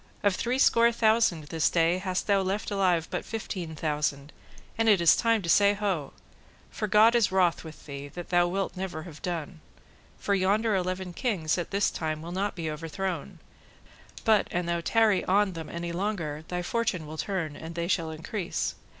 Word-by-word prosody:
of 200 Hz, -2 st, +3 dB
three 245 Hz, +5 st, -1 dB
score 235 Hz, -3 st, +5 dB
thousand 220 Hz, -7 st, +2 dB
this 160 Hz, -2 st, +2 dB
day 170 Hz, +1 st, +2 dB
hast 185 Hz, -1 st, -2 dB
thou 200 Hz, -1 st, +3 dB
left 195 Hz, +3 st, -2 dB
alive 180 Hz, -5 st, +2 dB
but -, -, -2 dB
fifteen 185 Hz, -7 st, -5 dB
thousand, 150 Hz, -2 st, -2 dB, 0.4 s
and 225 Hz, 0 st, +2 dB
it 205 Hz, -3 st, +5 dB
is 170 Hz, -2 st, +6 dB
time 230 Hz, -3 st, +2 dB
to -, -, -4 dB
say 200 Hz, +4 st, +5 dB
Ho! 190 Hz, -9 st, -2 dB, 0.6 s
For 215 Hz, -, -3 dB
God 215 Hz, +3 st, +6 dB
is 230 Hz, -5 st, +3 dB
wroth 180 Hz, -3 st, +2 dB
with 160 Hz, -2 st, -11 dB
thee, 140 Hz, -1 st, -7 dB
that 175 Hz, +4 st, -9 dB
thou 175 Hz, -1 st, +3 dB
wilt 195 Hz, +3 st, -2 dB
never 180 Hz, -4 st, -5 dB
have 155 Hz, -3 st, -11 dB
done; 170 Hz, -1 st, -4 dB, 0.6 s
for 200 Hz, -, -1 dB
yonder 205 Hz, +3 st, +2 dB
eleven 185 Hz, -1 st, -2 dB
kings 180 Hz, -, 0 dB
at 175 Hz, -, -4 dB
this 200 Hz, 0 st, +1 dB
time 155 Hz, -1 st, -3 dB
will 170 Hz, -, -7 dB
not 195 Hz, +3 st, -2 dB
be 165 Hz, -3 st, -4 dB
overthrown, 170 Hz, +3 st, -4 dB, 0.9 s
but 220 Hz, -3 st, +4 dB
an 175 Hz, 0 st, -2 dB
thou 170 Hz, 0 st, -1 dB
tarry 215 Hz, +1 st, +3 dB
on 195 Hz, 0 st, +2 dB
them 165 Hz, -2 st, -7 dB
any 170 Hz, 0 st, -4 dB
longer, 170 Hz, -5 st, -3 dB
thy 180 Hz, 0 st, -3 dB
fortune 185 Hz, -5 st, -1 dB
will 155 Hz, +1 st, -8 dB
turn 170 Hz, -7 st, -2 dB
and 165 Hz, +2 st, -8 dB
they 170 Hz, 0 st, -2 dB
shall 165 Hz, -3 st, 0 dB
increase. 170 Hz, +4 st, -3 dB
180 Hz, 185 wpm, -28 LUFS, 165-205 Hz, 0.9 s, is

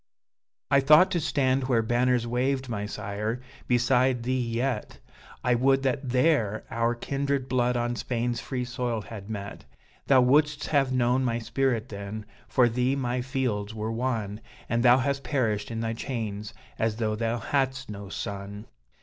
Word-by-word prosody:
"I 140 Hz, -, +6 dB
thought 150 Hz, +7 st, +6 dB
to 175 Hz, -, +1 dB
stand 135 Hz, -3 st, +1 dB
where 120 Hz, -3 st, +2 dB
banners 120 Hz, +1 st, +2 dB
waved, 130 Hz, +3 st, 0 dB
my 105 Hz, -4 st, -3 dB
sire! 105 Hz, +4 st, -3 dB, 0.3 s
beside 125 Hz, 0 st, +2 dB
thee 130 Hz, +1 st, 0 dB
yet 120 Hz, -2 st, -2 dB, 0.5 s
I 125 Hz, -, +3 dB
would 135 Hz, +3 st, +3 dB
that 135 Hz, 0 st, -1 dB
there 125 Hz, -5 st, +2 dB
our 115 Hz, +1 st, +1 dB
kindred 140 Hz, +1 st, -2 dB
blood 125 Hz, -1 st, +1 dB
on 120 Hz, 0 st, -1 dB
Spain's 120 Hz, -1 st, -2 dB
free 125 Hz, -1 st, -3 dB
soil 125 Hz, -2 st, -2 dB
had 105 Hz, 0 st, -9 dB
met! 100 Hz, -2 st, -6 dB, 0.4 s
Thou 135 Hz, -2 st, +6 dB
wouldst 145 Hz, +3 st, +3 dB
have 135 Hz, -3 st, +2 dB
known 125 Hz, +1 st, +2 dB
my 115 Hz, -2 st, 0 dB
spirit 120 Hz, 0 st, -1 dB
then 100 Hz, +1 st, -6 dB, 0.2 s
for 125 Hz, -2 st, +4 dB
thee 125 Hz, +3 st, +1 dB
my 125 Hz, -2 st, -1 dB
fields 120 Hz, -5 st, -2 dB
were 110 Hz, +1 st, -3 dB
won, 115 Hz, -4 st, -2 dB, 0.3 s
And 115 Hz, 0 st, +1 dB
thou 125 Hz, +1 st, +7 dB
hast 140 Hz, +1 st, -1 dB
perished 115 Hz, -8 st, 0 dB
in 115 Hz, -1 st, -3 dB
thy 115 Hz, 0 st, -1 dB
chains, 110 Hz, -4 st, -4 dB, 0.3 s
as 110 Hz, -1 st, +1 dB
though 110 Hz, -1 st, -1 dB
thou 115 Hz, +1 st, -1 dB
hadst 130 Hz, 0 st, -1 dB
no 100 Hz, -1 st, -8 dB
son!" 100 Hz, +2 st, -6 dB
120 Hz, 160 wpm, -27 LUFS, 110-130 Hz, 0.5 s, thou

